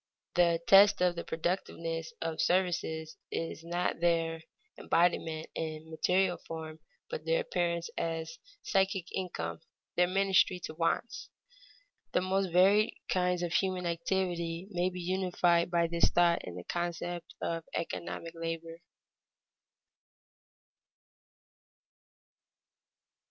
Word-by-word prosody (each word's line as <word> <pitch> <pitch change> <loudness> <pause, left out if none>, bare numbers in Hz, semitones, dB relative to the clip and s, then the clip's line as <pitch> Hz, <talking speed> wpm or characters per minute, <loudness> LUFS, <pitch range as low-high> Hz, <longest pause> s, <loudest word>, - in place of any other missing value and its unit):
The 170 -1 +4
test 200 +1 +7
of 180 -1 +3
the 170 - -4
productiveness 165 -1 -3
of 165 -1 -2
services 170 -3 0
is 165 0 -4
not 175 +1 -1
their 165 -1 +1 0.3
embodiment 165 -2 +1
in 160 0 -5
material 180 +3 +2
form, 160 -1 -6 0.3
but 485 +1 -5
their - - +2
appearance 170 - -1
as 165 0 -3 0.2
psychic 190 -2 +1
income, 85 - -3 0.4
their 180 0 +4
ministry 190 -1 +3
to 155 - -5
wants. 165 +8 -1 0.8
The - - +3
most 190 +1 +1
varied 195 +5 +5
kinds 180 -1 +1
of 175 -1 -2
human 185 -1 +1
activity 170 0 -1
may 180 0 +1
be 180 0 -7
unified 175 -1 +2
by 170 -1 +2
this 170 0 +2
thought 175 -1 +3
in 90 - -7
the 90 - -7
concept 175 - -4
of 165 -1 -2
economic 170 0 -4
labor. 165 0 -5
170 Hz, 110 wpm, -31 LUFS, 165-185 Hz, 0.8 s, test